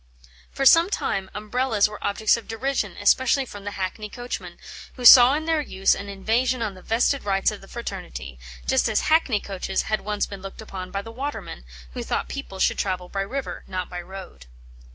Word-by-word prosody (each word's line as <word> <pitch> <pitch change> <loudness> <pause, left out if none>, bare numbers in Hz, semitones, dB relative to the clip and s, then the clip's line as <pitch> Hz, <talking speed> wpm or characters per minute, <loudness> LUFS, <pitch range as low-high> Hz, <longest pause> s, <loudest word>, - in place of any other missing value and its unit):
For 275 - -2
some 330 +6 +7
time 195 - -2
Umbrellas 215 +1 +1
were 210 0 -10
objects 210 +2 +2
of 230 - -8
derision, 225 -5 -2
especially 260 +6 +3
from 205 -4 -10
the - - -2
hackney 195 +3 -4
coachmen, 245 +2 -6 0.4
who 250 - -6
saw 250 +3 +10
in 310 +1 -3
their 320 -2 +1
use 195 -9 +2
an 200 0 -6
invasion 230 +5 0
on 210 -3 -2
the 185 - -13
vested 240 +7 +1
rights 195 0 +1
of 210 - -9
the 195 - -14
fraternity; 65 - -7 0.3
just - - +2
as - - +2
hackney 310 -9 +3
coaches 190 -1 -3
had 215 -1 -1
once 210 0 -1
been 200 -2 -9
looked 195 0 -9
upon 190 -4 -7
by 200 +2 -4
the 225 - -9
watermen, 225 - -6 0.3
who - - -4
thought - - -2
people 275 -9 -6
should - - +1
travel 180 -2 -2
by 195 - -2
river, 265 +8 -4
not 185 -1 -4
by 180 0 -4
road. 180 - -11
210 Hz, 195 wpm, -24 LUFS, 195-250 Hz, 0.4 s, saw